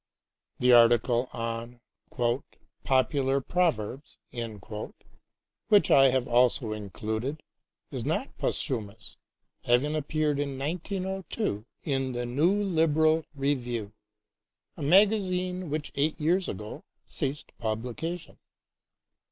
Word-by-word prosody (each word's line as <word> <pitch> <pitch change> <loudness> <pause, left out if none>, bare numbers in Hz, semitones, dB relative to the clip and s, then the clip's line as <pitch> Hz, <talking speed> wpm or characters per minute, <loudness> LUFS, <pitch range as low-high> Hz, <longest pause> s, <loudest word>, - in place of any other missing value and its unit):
The 125 0 +4
article 120 +1 +5
on 115 +1 -5 0.5
" 120 +4 -6
Popular 135 +1 +2
Proverbs," 140 -5 -1 1.5
which 205 -2 +5
I 135 - +7
have 130 -1 +2
also 120 -2 +3
included, 110 +7 -4 0.5
is - - -4
not - - -2
posthumous, 110 -3 -3 0.5
having 130 +6 +2
appeared 150 -1 0
in 140 -2 -2
1902 180 - -3 0.2
in 135 -3 -1
the 120 0 -2
New 145 +9 +2
Liberal 160 -3 +3
Review, 120 -6 -2 0.8
a - - -9
magazine 185 0 +3
which 150 0 -3
eight 150 +3 0
years 175 +4 +1
ago 105 +2 -7 0.2
ceased 140 +2 -4
publication. 120 +10 -4
135 Hz, 95 wpm, -28 LUFS, 120-160 Hz, 1.5 s, I